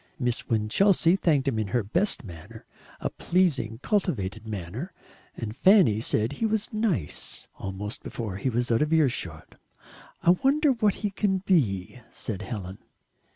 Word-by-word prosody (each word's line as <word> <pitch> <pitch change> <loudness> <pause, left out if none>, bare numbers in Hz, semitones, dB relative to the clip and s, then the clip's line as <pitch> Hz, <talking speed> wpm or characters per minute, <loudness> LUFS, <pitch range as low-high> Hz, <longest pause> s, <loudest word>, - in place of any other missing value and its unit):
Miss 120 -2 -2
Winchelsea 165 - +3
thanked 150 -8 +1
him 120 -5 +1
in 110 - -1
her 120 +3 0
best 175 - 0
manner 85 -6 -11 0.4
a - - -2
pleasing, 145 -11 0
cultivated 110 - -1
manner 110 - -5 0.4
and 110 -2 -5
Fanny 180 - +5
said 110 0 +1
he 225 - -2
was 220 +1 -1
"nice" 200 - -1
almost 100 +3 -5
before 105 -6 -5
he 130 - -1
was 120 0 -1
out 115 - +3
of 150 +1 +1
earshot. 155 -6 -1 0.6
"I 175 - +6
wonder 275 - +3
what 215 -5 +2
he 205 - 0
can 190 -1 0
be," 120 - +1
said 105 -5 -5
Helen. 100 -5 -6
125 Hz, 150 wpm, -26 LUFS, -, 0.6 s, I